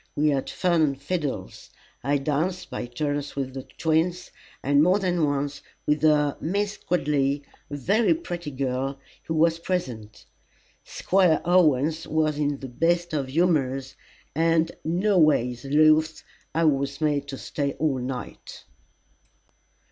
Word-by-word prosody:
We 150 +1 +2
had 140 -2 -1
fun 175 -3 +1
and 140 -3 +1
fiddles. 145 - -4 0.3
I 140 +3 +2
danced 155 +6 -2
by - - -4
turns 145 +3 -3
with 135 -2 -3
the 135 - -5
twins, 165 +6 -1 0.3
and 140 +1 +4
more 180 +5 +4
than 180 -5 +1
once 145 0 -2 0.2
with 150 0 +1
a 150 -2 +3
Miss 200 +5 -1
Gridley, 145 -4 0 0.3
a 145 - -5
very 210 - +2
pretty 175 - -5
girl, 135 0 -2 0.3
who 160 - -2
was 165 +1 +3
present. 125 - -4 0.6
Squire 180 -4 +2
Owens 160 -3 +3
was 155 -1 0
in 145 -2 -1
the 135 - -5
best 170 +6 0
of 140 -3 -1
humours, 135 -4 0 0.4
and, 165 +1 +2
no 185 +4 +2
ways 125 -6 +2
loth, 155 +2 +3 0.3
I 165 - +2
was 140 -2 +1
made 145 -2 0
to 135 -1 -6
stay 140 0 -3
all 150 -4 0
night. 125 0 -7
150 Hz, 140 wpm, -25 LUFS, 140-165 Hz, 0.6 s, and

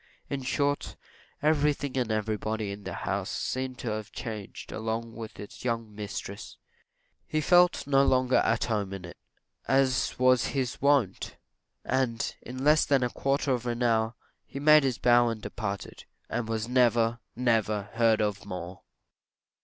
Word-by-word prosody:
In 140 -1 -2
short, 140 +2 -1 0.5
everything 145 -2 +1
and 125 -4 0
everybody 110 -1 -2
in 100 0 -9
the - - -4
house 95 +2 -1
seemed 130 -1 -3
to 120 - -3
have 105 -1 -5
changed 110 -5 -7
along 115 +1 -3
with 110 -1 -8
its 105 - -10
young 115 -3 -2
mistress; 100 -1 -7 0.7
he 155 - 0
felt 175 +3 +4
no 135 -1 +4
longer 130 -1 +3
at 115 - +2
home 105 -4 -1
in 95 -2 -6
it, 85 - -10 0.5
as 130 -2 +2
was 130 -1 +4
his 130 -2 -2
wont; 140 -9 +1 0.5
and, 125 -3 0
in 130 +2 -7
less 150 +1 +5
than 135 -3 +2
a 125 - 0
quarter 135 0 0
of 125 -1 -1
an 120 +1 -1
hour 115 0 +2 0.3
he 140 - -7
made 150 +1 +7
his 130 -3 0
bow 120 0 +4
and 115 -1 -5
departed, 100 -5 -5 0.3
AND 115 -1 -2
WAS 110 0 -2
NEVER 120 -2 +3 0.2
NEVER 110 -4 0
HEARD 115 -1 +3
OF 105 -1 -2
MORE. 90 -2 -7
120 Hz, 155 wpm, -28 LUFS, 110-130 Hz, 0.7 s, made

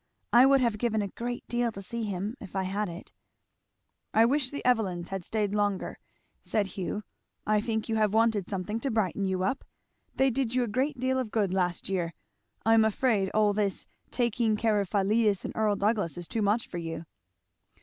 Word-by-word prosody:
I 245 +3 +8
would 275 -1 +5
have 230 -4 +1
given 220 -3 +1
a 200 - -4
great 240 +4 -5
deal 240 -1 0
to 195 - -7
see 235 +5 -4
him 200 +3 -3
if 190 - -10
I 190 - +1
had 200 +2 -2
it." 170 +3 -9 1.0
"I 225 +1 +7
wish 265 +1 +1
the 285 - -6
Evelyns 195 -8 +1
had 195 -2 -4
staid 210 +1 -1
longer," 205 -2 -1 0.4
said 210 -2 0
Hugh. 200 +2 -3 0.4
"I 210 0 +3
think 220 0 -2
you 225 -1 0
have 215 -2 +3
wanted 220 -3 +2
something 200 +3 -3
to 270 - -2
brighten 200 -4 0
you 185 -1 -1
up. 260 +8 -1 0.5
They 265 0 +3
did 245 -1 -1
you 255 - +3
a - - -2
great 265 +6 0
deal 260 +1 +1
of 250 -4 -2
good 205 -4 0
last 180 -2 0
year. 175 -4 -2 0.5
I 225 - +5
am 225 -1 +6
afraid 220 -3 +2
all 210 -1 +4
this 200 -2 -1 0.2
taking 235 -2 +1
care 215 -1 +2
of 195 - -4
Philetus 210 0 +2
and - - -5
Earl 215 -2 +2
Douglass 200 -6 0
is 175 -1 -6
too 225 - -2
much 210 +3 +1
for 175 - -5
you." 165 0 -5
215 Hz, 200 wpm, -28 LUFS, 195-235 Hz, 1.0 s, I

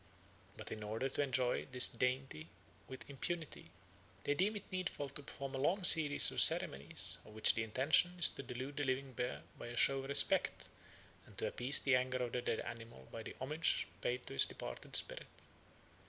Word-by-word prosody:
But - - -10
in 110 - -7
order 110 +5 -4
to 135 - -3
enjoy 130 -3 -2
this 125 -1 +7
dainty 125 -9 -4 0.4
with 130 -1 -11
impunity 160 +3 -6 0.5
they 145 - -1
deem 195 +8 -1
it 205 - -9
needful 180 -6 -5
to 145 - -8
perform 140 -1 -9
a 135 - -5
long 185 +8 -1
series 155 -4 +6
of - - +3
ceremonies, 70 +1 +4
of 105 - -16
which 110 - +5
the 110 - -3
intention 135 +10 +2
is 175 - +7
to - - -9
delude 130 +2 -8
the 145 - -2
living 135 0 -3
bear 125 +1 -5 0.2
by - - -9
a 120 0 -8
show 135 +2 +3
of 135 - -8
respect, 140 - +1 0.6
and - - -19
to - - -2
appease 130 +4 0
the 135 -2 +1
anger 130 0 -2
of 120 - -5
the 125 - -4
dead 120 - -3
animal 115 - -11
by 115 - -8
the - - -10
homage 150 +5 -1 0.2
paid 125 0 -4
to - - -8
his 70 - +4
departed - - -9
spirit. - - 0
130 Hz, 195 wpm, -35 LUFS, 120-145 Hz, 0.6 s, this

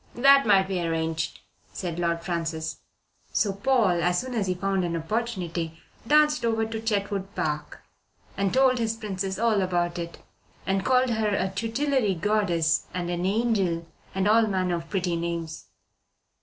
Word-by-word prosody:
"That 275 +1 +6
might 195 -2 +5
be 190 -2 -1
arranged," 165 -1 -2 0.3
said 175 -2 -4
Lord 170 -1 0
Francis. 160 -2 -3 0.5
So 200 -2 +1
Paul, 200 -4 +2
as 175 +1 +2
soon 255 0 -5
as 210 -5 0
he 185 - 0
found 195 0 0
an 170 -1 -1
opportunity, 170 -3 -3 0.3
danced 300 +1 +4
over 225 -1 +1
to 220 0 -5
Chetwood 200 -3 -2
Park 150 -1 -3 0.5
and 195 -1 0
told 260 -1 +4
his 225 -1 0
Princess 195 -3 -3
all 220 -2 +2
about 175 -1 0
it, 170 0 -6 0.5
and 195 0 0
called 255 +1 +3
her 220 -1 +1
a 190 -2 0
tutelary 230 +1 0
goddess 175 -4 +1
and 175 -1 -2
an 175 +1 -1
angel 195 -6 +1 0.3
and 190 +1 +1
all 220 +1 +5
manner 185 -3 0
of 165 0 -9
pretty 180 -3 -1
names. 170 -1 -4
195 Hz, 155 wpm, -26 LUFS, 170-225 Hz, 0.5 s, That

